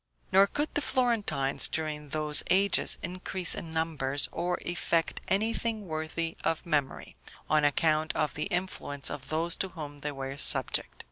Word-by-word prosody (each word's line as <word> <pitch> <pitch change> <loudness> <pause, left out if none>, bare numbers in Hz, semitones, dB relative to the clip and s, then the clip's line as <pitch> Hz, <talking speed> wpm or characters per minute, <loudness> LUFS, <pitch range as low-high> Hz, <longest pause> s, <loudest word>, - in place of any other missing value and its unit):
Nor 195 +1 +6
could 295 +8 -2
the 295 - +1
Florentines, 220 - +1
during 150 -2 -4
those 150 0 +3
ages, 195 +1 +3
increase 180 0 +1
in 165 - -6
numbers, 150 -4 0
or 180 0 -2
effect 170 -1 -1
anything 220 +1 -1
worthy 160 +1 -3
of 165 - -1
memory, 145 -5 -2 0.3
on 155 0 +2
account 155 +2 +2
of 155 -2 0
the 150 - -2
influence 180 -7 0
of 130 -2 -7
those 165 +2 0
to 190 - -1
whom 150 -5 -8
they 150 +1 -4
were 135 0 -6
subject. - - +2
160 Hz, 150 wpm, -29 LUFS, 150-185 Hz, 0.3 s, Nor